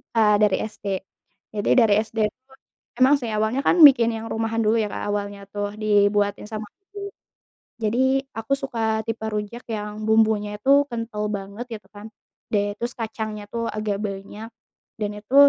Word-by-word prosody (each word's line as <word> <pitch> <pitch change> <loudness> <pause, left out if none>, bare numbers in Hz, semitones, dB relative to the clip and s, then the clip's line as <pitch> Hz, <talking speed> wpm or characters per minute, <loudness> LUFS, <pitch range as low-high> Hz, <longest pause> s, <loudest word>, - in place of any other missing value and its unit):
Ya 210 -2 +4
dari 210 -3 +4
SD. 215 -1 -12 0.7
Jadi 205 -1 -1
dari 225 -4 +6
SD 220 +1 -10
itu 260 +5 -35 0.5
emang 260 +3 +6
sih 235 - -3
awalnya 220 +5 0
kan - - +4
bikin 240 -5 +7
yang 225 0 -5
rumahan 225 0 -1
dulu 220 +2 +3
ya 210 - -1
Kak - - -4
awalnya 200 -1 -3
tuh 205 0 -2
dibuatin 205 -1 +2
sama 215 -1 -5 0.2
ibu. 400 0 -8 0.7
Jadi 220 +3 0 0.4
aku 225 +4 -3
suka 270 -4 -4 0.3
tipe 225 -1 -4
rujak 210 +3 -4
yang 210 0 -4
bumbunya 220 -1 +3
itu 265 +6 0 0.2
kental 230 -2 -4
banget 200 +3 -5
gitu - - -28
kan, 205 +1 -9 0.5
dan 205 -1 +1
terus 240 +1 -3
kacangnya 220 -2 -4
tuh 230 0 -2
agak 210 -2 -2
banyak, 205 +2 -6 0.5
dan 210 -1 -1
itu, 210 +6 -8
215 Hz, 165 wpm, -23 LUFS, 205-230 Hz, 0.7 s, bikin